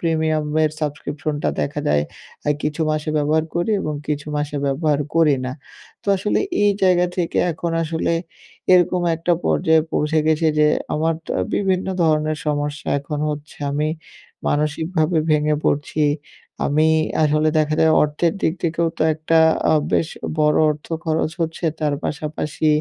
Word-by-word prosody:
প্রিমিয়ামের 155 -2 +1
সাবস্ক্রিপশনটা 150 0 -3
দেখা 145 +1 -2
যায়, 75 0 +3 0.5
আ - - +4
কিছু 150 +2 -2
মাসে 155 0 -1
ব্যবহার 155 +2 +2
করি 175 +5 0
এবং 150 - -3
কিছু 145 -1 -3
মাসে 145 0 -2
ব্যবহার 150 +1 +1
করি 160 -4 +4
না। 130 - -3 0.5
তো - - -25
আসলে 205 +3 0 0.3
এই 205 - +5
জায়গা 180 -1 +4
থেকে 175 -2 -1
এখন 165 +1 -3
আসলে, 165 +1 -1 0.6
এরকম 180 0 +4
একটা 170 +2 0
পর্যায়ে 160 0 +3
পৌঁছে 155 +1 +1
গেছি 160 +1 +2
যে, 150 0 +5 0.3
আমার 160 +2 +1
তো - - -8 0.2
বিভিন্ন 190 -2 0 0.2
ধরনের 155 -1 +1
সমস্যা 145 0 -2
এখন 145 +1 -5
হচ্ছে। 150 0 -7
আমি 150 +2 0 0.6
মানসিকভাবে 155 +2 0
ভেঙে 150 0 +3
পড়ছি, 145 +1 0 0.6
আমি 155 +2 +3 0.4
আসলে 155 +1 +3
দেখা 155 0 +1
যায় 160 0 +5
অর্থের 150 +3 +1
দিক 160 - +2
থেকেও 165 0 0
তো - - +2
একটা 160 +1 +1 0.3
আ - - +4 0.2
বেশ 160 - +2 0.3
বড় 150 0 +3
অর্থ 150 0 -5 0.2
খরচ 160 0 0
হচ্ছে, 165 +1 -2 0.2
তার 150 -2 +1
পাশাপাশি 150 0 -3
155 Hz, 145 wpm, -21 LUFS, 150-160 Hz, 0.6 s, এই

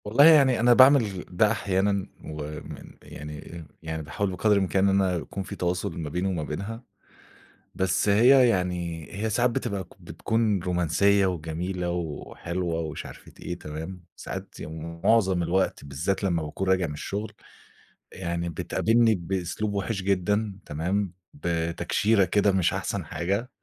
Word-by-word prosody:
والله 115 +8 +5
يعني 140 -6 +6
أنا 120 +1 +6
باعمل 120 -8 +5
ده 105 +4 +3
أحيانًا 100 -2 0 0.2
ومن 75 0 -8
يعني 75 +3 -9 0.2
يعني 80 -1 -4
باحاول 95 +6 -2
بقدر 105 +4 +1
الإمكان 100 0 +2
إن 100 0 +3
أنا 95 -2 +1
يكون 95 +3 -5
في - - -7
تواصل 90 0 -2
ما 80 -3 -4
بيني 90 +5 -1
وما 90 -5 -1
بينها، 100 +11 -5 0.9
بس 95 +2 +1
هي 125 +5 +6
يعني 90 -5 -2
هي 110 +3 -2
ساعات 120 +3 +2
بتبقى 100 -5 -3
بتكون 110 -3 0
رومانسية 95 +3 +2
وجميلة 90 +1 -3
وحلوة 85 +1 -3
ومش 80 -2 -5
عارفة - - -12
إيه 90 0 -5
تمام، 80 +4 -7
ساعات - - -7
يعني 80 +2 -7
مُعظم 95 -6 +3
الوقت 90 -2 0
بالذات 80 +9 -2
لمّا 85 -4 +1
باكون 85 +5 -3
راجع 95 -2 +2
من 75 - -5
الشُغل، 105 +8 -4 0.8
يعني 85 -2 -3
بتقابلني 115 +7 +2
بأسلوب 95 +3 -3
وِحِش 100 +1 -2
جدًا 100 +2 0
تمام، 90 +5 -2 0.2
بتكشيرة 85 - +1
كده 100 +3 +3
مش 95 -3 +2
أحسن - - -3
حاجة، 100 +8 -2
95 Hz, 140 wpm, -26 LUFS, 85-105 Hz, 0.9 s, يعني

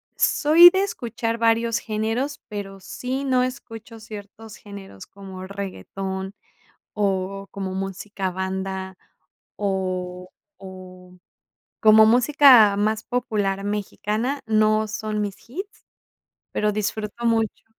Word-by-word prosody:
soy 330 +4 +7
de 380 +2 +1
escuchar 235 - -3
varios 230 0 +2
géneros, 225 +6 -2
pero, 195 -2 -6
sí 255 +7 -4
no 255 -2 +2
escucho 230 -3 -6
ciertos 215 0 -11
géneros 195 - -11
como 190 -1 -10
reguetón, 190 - -6 0.6
o 195 -1 -1
como 190 -1 -5
música 195 0 -4
banda 190 0 -4 0.6
o 185 -2 -3 0.3
o 185 -1 -12 0.6
como 220 0 +7
música 245 -3 +6
más 215 +1 0
popular 205 -6 -1
mexicana, 210 +5 -2
no 215 0 +3
son 215 0 -3
mis 200 -1 -3
hits, 385 - -8 0.7
pero, 210 0 0
disfruto 215 +2 -3
mucho. 225 -2 0
210 Hz, 105 wpm, -23 LUFS, 195-230 Hz, 0.7 s, soy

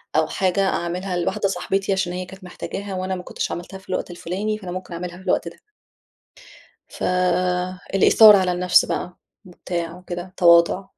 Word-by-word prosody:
أو 160 0 +3
حاجة 190 +2 0
أعملها 180 +2 -2
لواحدة 190 +3 0
صاحبتي 195 +2 -1
عشان 185 -2 -1
هي 180 0 -4
كانت 190 +1 -13
محتاجاها 195 +2 -6
وأنا 185 0 -2
ما 180 - -7
كُنتش - - -4
عملتها 185 +2 -6
في 190 - -19
الوقت 185 - -3
الفلاني، 200 +5 -3
فأنا 185 -4 -8
مُمكن 185 -1 -6
أعملها 175 +1 -6
في 190 - -14
الوقت - - 0
ده. - - -10 1.3
ف - - -10 0.9
الإيثار 210 +2 +8
على 185 -2 +1
النفس 180 0 +4
بقى، 180 0 -4 0.3
وبتاع 175 -1 -5
وكده، 180 0 -7
تواضع. 170 +2 +5
185 Hz, 165 wpm, -22 LUFS, 175-190 Hz, 1.3 s, الإيثار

